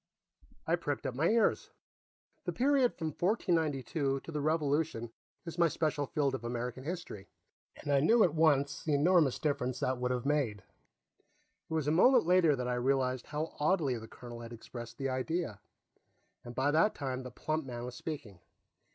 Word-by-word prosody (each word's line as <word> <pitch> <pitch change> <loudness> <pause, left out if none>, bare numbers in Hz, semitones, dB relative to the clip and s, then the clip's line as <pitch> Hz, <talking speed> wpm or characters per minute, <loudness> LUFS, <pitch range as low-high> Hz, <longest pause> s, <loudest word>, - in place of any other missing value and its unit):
I 170 +2 +2
pricked 145 -4 -3
up 130 - -1
my 155 +7 +2
ears. 230 0 +2 0.8
The - - -1
period 265 -1 +2
from 160 -2 -3
1492 155 - 0
to - - -9
the 150 -2 -2
Revolution 150 -5 0 0.3
is 165 0 -7
my 170 - +6
special 155 -3 -1
field 140 -3 0
of 130 - -4
American 120 +2 -4
history, 150 - -6 0.5
and 145 - -5
I 140 - +5
knew, 220 +10 +5
at 170 - +2
once, 145 -3 +2
the 155 -3 +1
enormous 155 -2 +4
difference 130 -4 -1
that 130 -1 0
would 125 0 0
have 125 0 -2
made. 135 -9 0 1.1
It - - -4
was 155 -3 0
a - - +3
moment 220 +7 +5
later 175 -4 +4
that 125 -1 -3
I 125 - 0
realized 130 -1 0
how 155 +2 -4
oddly 150 -4 +2
the 110 - -10
colonel 120 0 -10
had 115 0 -8
expressed 120 +1 -9
the 135 -1 -2
idea, 130 - -2 0.8
and 120 0 -9
by 135 +3 +2
that 165 +8 +3
time 130 -3 -3
the 125 - -7
plump 155 +6 -2
man 120 -1 -5
was 125 - -6
speaking. 125 - -7
145 Hz, 175 wpm, -32 LUFS, 125-160 Hz, 1.1 s, my